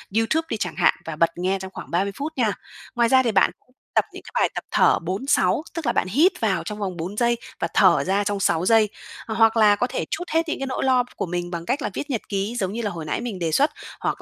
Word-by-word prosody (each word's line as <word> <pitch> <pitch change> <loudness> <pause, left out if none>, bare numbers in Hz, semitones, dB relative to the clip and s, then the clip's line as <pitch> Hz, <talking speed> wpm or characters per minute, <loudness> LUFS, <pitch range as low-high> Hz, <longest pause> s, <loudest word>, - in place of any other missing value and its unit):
YouTube 315 +9 +1
đi 220 - -1
chẳng - - -3
hạn, - - +4
và 160 - -5
bật 165 +2 +3
nghe 190 +2 0
trong 190 0 -8
khoảng 135 - -9
30 195 +4 +1
phút 310 +3 -4
nha. 220 -5 +2 0.4
Ngoài 235 -1 +3
ra 260 -1 +5
thì 230 - +1
bạn 190 - +4
cũng 255 - -33 0.2
tập - - +4
những - - -10
cái - - -12
bài - - +3
tập - - -3
thở - - +4
4-6 200 - +1
tức 330 -4 -5
là 235 - +2
bạn 185 - 0
hít 305 - +4
vào 215 -4 +1
trong 210 -1 -6
vòng 185 -4 -3
4 180 +6 -5
giây 235 0 +2 0.2
và - - 0
thở 185 -4 +5
ra 195 +2 +1
trong 205 -1 -2
6 175 -2 +1
giây. 220 0 +4 0.4
Hoặc 225 0 +3
là 210 -2 +6
có 245 +4 0
thể - - -3
trút 350 +2 -3
hết 325 0 +1
những - - -2
cái 270 - -2
nỗi 260 - -2
lo 255 -2 +3
của - - -2
mình 175 0 -3
bằng 170 -1 -5
cách 270 - -1
là - - -1
viết 290 - -5
nhật 235 -5 -1
ký 200 +3 -2
giống 190 0 -1
như 235 - -3
là 210 - -1
hồi 165 -3 -6
nãy 155 - -2
mình 225 -6 -5
đề 165 -2 -1
xuất, 290 - +3 0.3
hoặc - - -2
215 Hz, 280 wpm, -23 LUFS, 185-250 Hz, 0.4 s, là